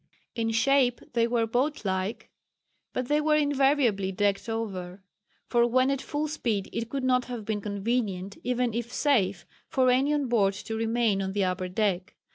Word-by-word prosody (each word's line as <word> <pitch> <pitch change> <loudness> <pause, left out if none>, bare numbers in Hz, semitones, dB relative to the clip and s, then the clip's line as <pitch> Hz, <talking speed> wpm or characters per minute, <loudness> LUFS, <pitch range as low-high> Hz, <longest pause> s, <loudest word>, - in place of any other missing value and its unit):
In 225 -1 -1
shape 245 +2 +3
they 230 -1 +3
were 235 -1 +1
boat 255 +4 -1
like, 190 +3 -2 0.6
but 255 -1 -3
they 295 +2 +2
were 305 0 +3
invariably 270 -9 +2
decked 200 +3 0
over, 195 -4 -4 0.4
for 240 -1 +3
when 255 +3 +3
at 275 -1 -1
full 300 +1 -2
speed 230 -10 -2
it 230 0 -3
could 275 +1 -3
not 250 -1 +2
have 240 -4 -6
been 210 -1 -2
convenient, 200 -2 -2
even 245 -1 0
if 235 +1 -3
safe, 200 -13 +1 0.2
for 255 -1 +3
any 265 +4 +2
on 295 -2 +1
board 200 -5 +2
to 220 +2 -5
remain 225 -2 +1
on 190 0 -3
the 200 -1 +1
upper 185 0 -1
deck. 190 -1 -1
230 Hz, 175 wpm, -27 LUFS, 200-255 Hz, 0.6 s, shape